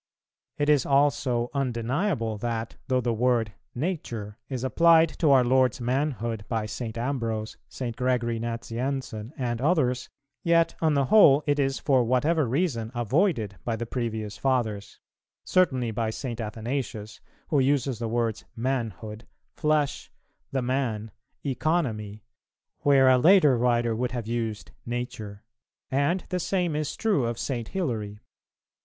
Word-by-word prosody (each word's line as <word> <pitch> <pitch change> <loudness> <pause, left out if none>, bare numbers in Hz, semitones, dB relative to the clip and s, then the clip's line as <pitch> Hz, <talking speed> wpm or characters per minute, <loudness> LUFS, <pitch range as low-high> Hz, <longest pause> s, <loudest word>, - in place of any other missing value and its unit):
It 145 - 0
is 145 -3 +4
also 135 -4 +1
undeniable 125 - -1
that, 115 0 -3
though 130 -2 +2
the 120 -1 0
word 115 -2 +1 0.2
"nature" 120 - -4
is 130 -2 -4
applied 165 +5 +5
to 155 - +3
our 135 -2 +6
Lord's 130 -1 +3
manhood 120 -4 -1
by 115 -2 -1
St. 110 +1 -5
Ambrose, 115 -4 -2
St. 120 -3 -5
Gregory 120 -2 0
Nazianzen 115 0 -4
and 120 -3 -2
others, 130 -5 +1 0.3
yet 170 -1 +3
on 160 -2 +3
the 140 -1 +2
whole 150 -9 +7
it 145 0 +1
is 135 -1 +1
for 130 -4 +2
whatever 140 +5 +2
reason 120 -5 -1
avoided 120 - 0
by 115 - -1
the 120 +1 -4
previous 110 -3 -3
Fathers; 120 -7 -1 0.5
certainly 130 -11 +2
by 110 0 -1
St. 120 0 -4
Athanasius, 110 0 -4 0.3
who 145 - +3
uses 135 -3 +1
the 115 - -2
words 115 -1 -1
"manhood," 115 -3 -3 0.3
"flesh," 150 -2 0 0.4
"the 130 -2 -1
man," 120 -4 -1 0.3
"economy," 120 -8 -1 0.6
where 135 -2 +5
a 130 -1 +6
later 160 -3 +6
writer 120 -1 +1
would 125 +2 -2
have 120 -3 -3
used 115 -2 -3
"nature:" 120 -4 -5 0.5
and 145 +7 +1
the 180 - -1
same 175 -3 0
is 150 -1 -2
true 200 - +1
of 115 -1 -3
St. 120 -4 -3
Hilary. 115 - -3
125 Hz, 135 wpm, -26 LUFS, 115-140 Hz, 0.6 s, whole